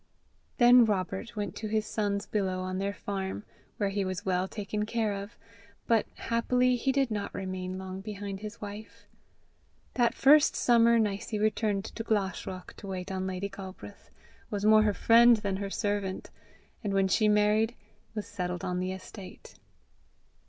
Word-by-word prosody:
Then 245 -1 +8
Robert 205 +2 -2
went 205 -4 -3
to 215 - -4
his 215 0 0
sons 205 -2 -1
below 190 -3 -1
on 185 0 -3
their 200 +1 -1
farm, 195 0 -4 0.3
where 200 -2 0
he 200 0 -1
was 185 +1 -4
well 185 0 +1
taken 210 +1 -3
care 225 -2 0
of; 200 +3 -7 0.5
but 230 -3 +2
happily 250 +2 +1
he 265 +3 0
did 270 -3 +1
not 205 -1 -3
remain 185 -1 -4
long 190 0 -6
behind 200 -1 -6
his 215 +2 -8
wife. 210 +1 -9 0.9
That 240 -2 +2
first 290 +2 +6
summer, 235 -1 +4
Nicie 210 0 -1
returned 210 -1 0
to 225 - -6
Glashruach 190 -4 -2
to 200 - -9
wait 185 -1 -5
on 190 0 -2
Lady 185 +1 -3
Galbraith, 190 - -10 0.4
was 205 0 -2
more 215 0 +7
her 210 -1 +2
friend 235 +1 +6
than 200 -2 -2
her 200 0 -4
servant, 205 -2 -2 0.5
and 200 -2 -1
when 195 0 +3
she 215 +3 +3
married, 210 +2 +3 0.4
was 210 - -3
settled 180 -3 -4
on 180 0 -1
the 185 0 -2
estate. 190 0 -10
205 Hz, 160 wpm, -29 LUFS, 190-220 Hz, 0.9 s, Then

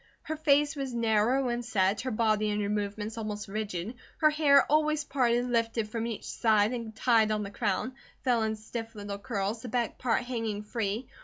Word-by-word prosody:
Her 315 - -3
face 295 0 +3
was 270 -3 -4
narrow 230 +3 +2
and 240 0 -2
set, 200 -2 +1
her 260 - -3
body 215 -2 +1
and 210 0 -1
her 200 - -1
movements 210 +1 -3
almost 210 -1 -4
rigid, 205 0 -4 0.2
her 310 -1 +4
hair, 290 -2 +5
always 305 0 +2
parted, 245 -4 +1
lifted 230 -2 0
from 230 +1 -2
each 225 -3 -5
side 220 0 +2
and 230 -3 -5
tied 225 -2 +3
on 215 -1 0
the 200 - -6
crown, 215 +4 -1 0.3
fell 245 -3 +2
in 220 0 0
stiff 225 +1 -7
little 205 -1 -6
curls, 205 0 -2
the 245 - -7
back 235 0 -1
part 240 -2 +1
hanging 225 -4 -3
free. 220 +2 -3
225 Hz, 190 wpm, -29 LUFS, 210-250 Hz, 0.3 s, hair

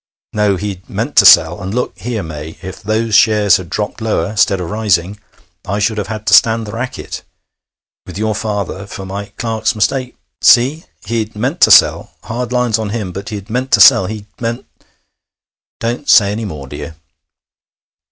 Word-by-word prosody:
No, 105 -2 +1
he'd 95 -1 -6
meant - - -4
to - - +8
sell... - - +5
and, 95 +3 -5
look 125 - -2
here, 115 -3 -4
May, 80 0 -8
if 95 +1 -8
those 110 +2 -2
shares 105 -2 +4
had 90 -3 -9
dropped 105 +4 -4
lower... 105 -3 -2
'stead 100 -2 +2
of 90 - -4
rising... 105 -2 0 0.4
I 100 +1 -3
should 105 +1 0
have 100 - -4
had 110 0 -6
to - - +1
stand 115 0 +4
the 105 - -7
racket... 125 +3 -6 0.9
with - - -8
your 110 +1 -1
father, 100 -2 -4
for 95 - -8
my 100 +2 -5
clerk's 115 0 -1
mistake.... 125 +4 -1 0.3
See?... 135 +7 +4 0.2
He'd 110 0 -3
meant 130 +11 -3
to - - +6
sell.... - - +4
Hard 120 +2 -5
lines 125 -3 +1
on 110 -2 -3
him, 105 -4 -4
but 100 +2 -7
he'd 105 -2 -7
meant 130 +3 -2
to 105 - +5
sell.... 95 0 +7
He'd 105 0 -7 0.2
meant 115 +1 -3 0.6
' - - -75
'Don't 120 +5 -3
say 100 -3 +6
any 110 +2 -4
more, 75 -8 -7
dear.' 80 +4 -8
105 Hz, 180 wpm, -15 LUFS, 100-115 Hz, 0.9 s, to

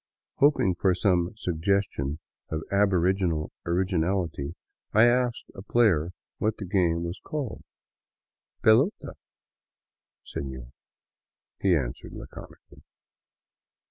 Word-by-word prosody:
Hoping 140 -10 +4
for 95 -2 +3
some 90 -1 +1
suggestion 90 -6 -1 0.3
of 80 0 -3
aboriginal 95 -4 +2 0.2
originality, 85 -3 0 0.4
I 110 - +6
asked 120 0 +2
a - - -9
player 95 -7 +3 0.3
what 110 +1 0
the 100 - -5
game 85 -3 +1
was 85 +2 -5
called. 145 -6 -4 0.5
" - - -50
Pelota 120 - +6
(ball), - - -8 1.1
sefior," 65 -3 -6 0.9
he 95 -3 +3
answered 65 -6 -3
laconically. - - -12
95 Hz, 100 wpm, -27 LUFS, 80-105 Hz, 1.1 s, I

